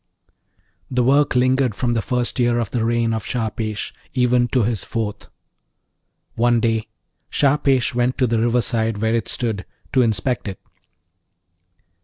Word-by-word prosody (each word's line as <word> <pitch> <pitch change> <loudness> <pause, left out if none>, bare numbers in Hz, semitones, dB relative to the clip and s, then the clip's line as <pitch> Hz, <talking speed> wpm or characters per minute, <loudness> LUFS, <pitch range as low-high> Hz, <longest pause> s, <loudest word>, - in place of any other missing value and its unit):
The 125 -1 +1
work 140 +3 +3
lingered 130 -2 +2
from 120 +1 0
the 115 - +1
first 125 +2 -2
year 120 -1 +2
of 115 -4 -2
the 120 - 0
reign 115 0 +1
of 110 -2 -2
Shahpesh 110 -3 -3 0.2
even 125 -1 +3
to 125 -1 +1
his 110 -2 -1
fourth. 110 -3 -4 1.1
One 120 0 +2
day 115 -1 0 0.4
Shahpesh 140 -3 +2
went 125 +1 0
to 130 - +3
the 115 -1 +1
riverside 115 -1 +1
where 110 +2 0
it 115 -2 0
stood, 110 -5 -2 0.3
to 130 - +4
inspect 115 +1 0
it. 95 -2 -6
120 Hz, 145 wpm, -21 LUFS, 110-125 Hz, 1.1 s, to